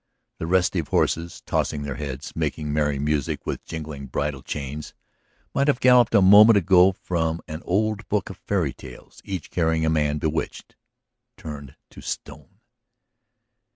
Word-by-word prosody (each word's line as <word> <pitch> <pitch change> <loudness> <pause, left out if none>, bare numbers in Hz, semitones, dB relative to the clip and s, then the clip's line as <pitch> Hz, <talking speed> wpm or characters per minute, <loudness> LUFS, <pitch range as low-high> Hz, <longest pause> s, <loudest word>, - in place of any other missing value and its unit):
The 80 - -3
restive 90 -2 +1
horses, 85 +1 -1
tossing 75 -1 -1
their 70 -1 -4
heads, 70 -1 -6
making 75 -2 -2
merry 75 -2 +1
music 75 0 -1
with - - -4
jingling 75 -4 -7
bridle 70 +1 -3
chains, 75 +1 -6 0.6
might 140 +1 +1
have 140 -4 +2
galloped 125 -2 +5
a 100 - +6
moment 105 +3 +8
ago 95 0 +5
from 85 -3 -2
an 80 +1 -6
old 110 +3 -1
book 100 -2 -1
of - - -11
fairy 90 -9 -1
tales, 65 -2 -13
each 95 -5 -6
carrying 80 -2 +1
a 80 - +2
man 75 -1 +1
bewitched, 80 +1 -3 0.6
turned 70 -3 -9 0.2
to - - -12
stone. - - -8
80 Hz, 150 wpm, -24 LUFS, 75-95 Hz, 0.6 s, moment